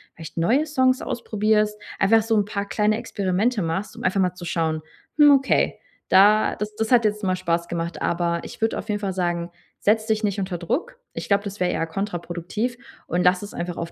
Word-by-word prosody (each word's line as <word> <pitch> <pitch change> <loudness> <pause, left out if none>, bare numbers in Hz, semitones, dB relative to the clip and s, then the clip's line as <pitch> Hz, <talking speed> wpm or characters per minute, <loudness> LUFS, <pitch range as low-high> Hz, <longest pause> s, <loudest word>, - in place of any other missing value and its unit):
vielleicht 165 0 -10
neue 245 - +2
Songs 260 -4 +2
ausprobierst. 215 -2 0 0.2
Einfach 220 +3 +4
so 225 0 +1
'n 205 -1 +2
paar 200 -1 -4
kleine 210 +1 +1
Experimente 205 +3 -1
machst, 165 +5 -3
um - - -9
einfach 185 +1 +1
mal 180 -1 +2
zu 175 -1 -9
schauen: 160 -2 -1 0.4
„Hm, 295 - +8
okay, 270 0 +1 0.3
da 205 +3 +5
das 210 0 -5
das 220 +2 -2
hat 240 -3 +5
jetzt 210 0 0
mal 185 -1 +1
Spaß 170 -1 -1
gemacht.“ 170 0 -4
Aber 170 0 0
ich - - -10
würde 225 0 0
auf - - -7
jeden 205 -1 0
Fall 195 -2 -2
sagen, 175 -1 -1 0.3
setz 215 +1 +2
dich 220 0 0
nicht 205 -1 0
unter 185 -2 -3
Druck. 345 - -3
Ich - - -6
glaube, 200 0 +2
das 200 -1 -7
wäre 180 - +1
eher 165 - -1
kontraproduktiv 190 +5 -3 0.3
und 175 +2 0
lass 180 0 +3
es 205 - -8
einfach 175 0 -4
auf 170 0 -4
200 Hz, 210 wpm, -23 LUFS, 175-215 Hz, 0.4 s, Hm